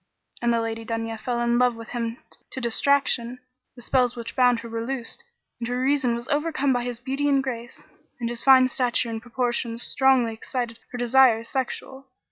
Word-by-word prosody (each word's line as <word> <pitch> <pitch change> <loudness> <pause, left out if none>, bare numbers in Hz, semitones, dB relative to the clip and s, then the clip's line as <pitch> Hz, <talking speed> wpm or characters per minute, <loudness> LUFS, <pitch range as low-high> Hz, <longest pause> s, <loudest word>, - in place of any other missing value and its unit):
And 240 0 +2
the 235 - +2
Lady 225 0 -4
Dunya 225 0 -4
fell 240 0 -2
in 240 0 +2
love 250 -1 +3
with 230 -1 -10
him 235 -1 -3 0.3
to - - -6
distraction; 250 0 +1 0.4
the 245 - -10
spells 250 0 +2
which 230 -1 -7
bound 245 -2 +4
her 235 - -8
were 230 0 -4
loosed 245 -1 -5 0.4
and 235 - -3
her 245 +1 -2
reason 260 -2 +2
was 235 +1 -6
overcome 290 -2 +1
by 245 -1 -1
his 245 -1 -4
beauty 270 +3 -1
and 275 -1 +3
grace; 240 -2 -6 0.4
and 235 - -2
his 235 0 -2
fine 260 -1 +7
stature 245 -2 0
and 225 0 -4
proportions 240 -1 -2
strongly 265 -4 +3
excited 235 +1 -4
her 245 - -5
desires 240 -2 +4
sexual. 265 +1 -4
245 Hz, 190 wpm, -25 LUFS, 230-260 Hz, 0.4 s, fine